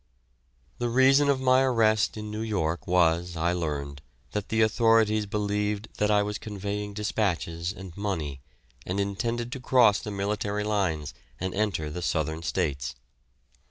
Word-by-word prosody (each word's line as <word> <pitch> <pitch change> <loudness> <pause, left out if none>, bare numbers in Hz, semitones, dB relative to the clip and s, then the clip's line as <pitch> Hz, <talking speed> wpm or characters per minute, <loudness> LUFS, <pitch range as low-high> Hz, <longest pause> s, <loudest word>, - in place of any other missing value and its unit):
The 120 0 0
reason 135 +4 +5
of 140 -2 +3
my 130 0 +4
arrest 110 -5 +2
in 105 0 -6
New 105 +1 -4
York 90 -7 -2
was, 85 -1 +2
I 85 +2 +1
learned, 70 -5 -3 0.3
that 105 -1 -3
the 110 0 +2
authorities 110 -1 +3
believed 105 0 -1
that 105 - +2
I 105 -1 +4
was 105 0 -3
conveying 105 0 -4
despatches 90 -5 -1
and 95 -4 -10
money 80 -10 -3 0.4
and 95 +2 -3
intended 115 +4 -2
to 130 - -4
cross 125 -5 +4
the - - -6
military 105 +1 -2
lines 95 -8 -1 0.3
and 95 0 -3
enter 95 -8 -1
the 90 - -5
Southern 80 -1 -1
States. 75 -7 -2
105 Hz, 150 wpm, -27 LUFS, 85-110 Hz, 0.4 s, reason